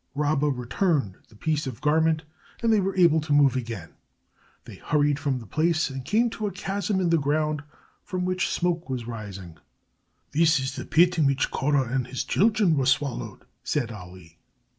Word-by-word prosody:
Rabba 150 0 +1
returned 130 - 0
the 110 - -19
piece 150 +5 -1
of 125 -4 -6
garment, 160 +2 +2 0.4
and 230 -1 +4
they 215 - +4
were 195 0 -1
able 170 -4 +4
to 150 0 -6
move 140 -3 +5
again. 115 -9 -5 0.7
They - - -11
hurried 145 -1 +1
from 140 -3 -1
the 120 - -9
place 155 +1 0
and 135 -1 -6
came 225 - +1
to 215 -2 -3
a - - -3
chasm 200 0 -2
in 175 -2 +1
the 165 - +4
ground 150 +1 0 0.4
from 180 -1 -3
which 185 0 0
smoke 175 -3 -1
was 125 -3 -3
rising. 100 -8 -8 0.7
"This 160 0 +3
is 130 +1 -3
the - - -6
pit 175 +1 +3
in 150 - +4
which 140 +1 0
Korah 135 -3 0
and 130 -2 0
his 130 0 -3
children 205 -4 +2
were 135 -3 +1
swallowed," 140 -5 -1 0.2
said 125 -6 -1
Ali. 90 -4 -12
150 Hz, 185 wpm, -25 LUFS, 130-170 Hz, 0.7 s, move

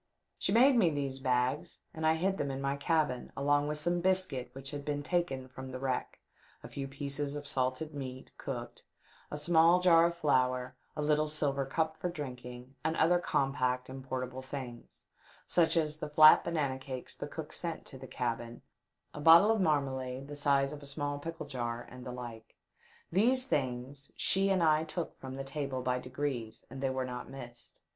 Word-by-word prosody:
She - - +1
made 255 +5 +6
me 190 -7 +5
these 140 -3 -2
bags, 130 +2 0 0.2
and 160 0 -1
I 160 - +4
hid 190 +4 0
them 140 - 0
in 135 0 -3
my 140 0 0
cabin, 145 -3 0
along 145 +1 +2
with 150 0 -2
some 175 +3 0
biscuit 180 -9 0
which 135 +1 -7
had 145 -1 -5
been 145 0 -2
taken 145 -7 -1
from 130 +1 -9
the 130 - -5
wreck, 130 -1 -2 0.4
a - - -7
few 135 -1 -5
pieces 140 +1 -3
of 145 0 -5
salted 130 +3 -1
meat 130 -2 -7
cooked, 120 -3 -6 0.5
a 150 - -4
small 165 +3 +5
jar 170 -2 +6
of 170 0 -5
flour, 130 -4 +1 0.2
a 150 - -2
little 150 0 +2
silver 140 -3 0
cup 160 +2 -1
for 180 - -2
drinking, 125 -5 -7
and 160 +1 0
other 175 +2 +4
com 135 -5 +1
pact 125 -2 0
and 130 0 -7
portable 130 0 -4
things, 130 -3 -8 0.4
such 170 -1 +3
as 155 -1 +1
the - - -4
flat 155 +1 +8
banana 145 -6 -1
cakes 130 -1 -7
the - - -5
cook - - -7
sent - - -4
to - - -11
the - - -9
cabin, 120 -1 -3 0.5
a 150 - -7
bottle 165 +7 +8
of 220 -2 +2
marmalade 135 -5 0
of - - -11
the 145 - -6
size 140 -1 +2
of 150 - -8
a 140 - -9
small 145 0 -3
pickle 165 +2 -6
jar, 120 -4 -4
and 125 0 -9
the - - -4
like. 120 -3 -8 0.6
These 250 +8 +3
things 135 - -2
she 195 +1 +2
and 190 -3 +3
I 155 -1 +4
took 165 +1 -5
from 130 0 -7
the 135 - -4
table 135 -2 -3
by 125 0 +1
degrees, 125 -3 -4
and 135 - -7
they 135 - +1
were 130 0 -1
not 125 -1 -6
missed. 120 -3 -11
140 Hz, 195 wpm, -32 LUFS, 130-160 Hz, 0.6 s, flat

